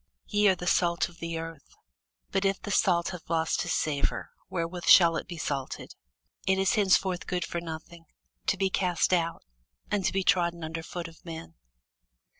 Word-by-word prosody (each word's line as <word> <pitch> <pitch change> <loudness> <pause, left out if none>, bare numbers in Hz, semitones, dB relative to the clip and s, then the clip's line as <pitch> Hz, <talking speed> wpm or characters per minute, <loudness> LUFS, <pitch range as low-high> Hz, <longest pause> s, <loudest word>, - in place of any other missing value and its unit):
Ye 205 0 +3
are 190 - +5
the 175 - -7
salt 170 -1 +2
of 170 - -18
the 165 0 -3
earth: 165 -3 -8 0.6
but 195 - +1
if 195 0 +1
the 205 - -6
salt 175 -4 +3
have 180 -2 -9
lost 165 -1 +1
his - - -1
savour, 145 -2 -1 0.2
wherewith 170 0 -3
shall 170 -3 +8
it - - -3
be 175 - -7
salted? 140 -4 -4 0.5
it 190 0 +4
is 190 0 +2
thenceforth 190 -3 +2
good 180 -1 -1
for 170 - -4
nothing, 165 0 -8 0.4
but - - -36
to - - +1
be 195 -1 +1
cast 180 -1 +1
out, 170 -2 0 0.5
and 205 -2 +1
to - - +2
be 195 0 0
trodden 170 -2 +2
under 165 +1 -4
foot 170 +1 -6
of 165 -1 -16
men. 165 - -8
170 Hz, 190 wpm, -28 LUFS, 165-185 Hz, 0.6 s, shall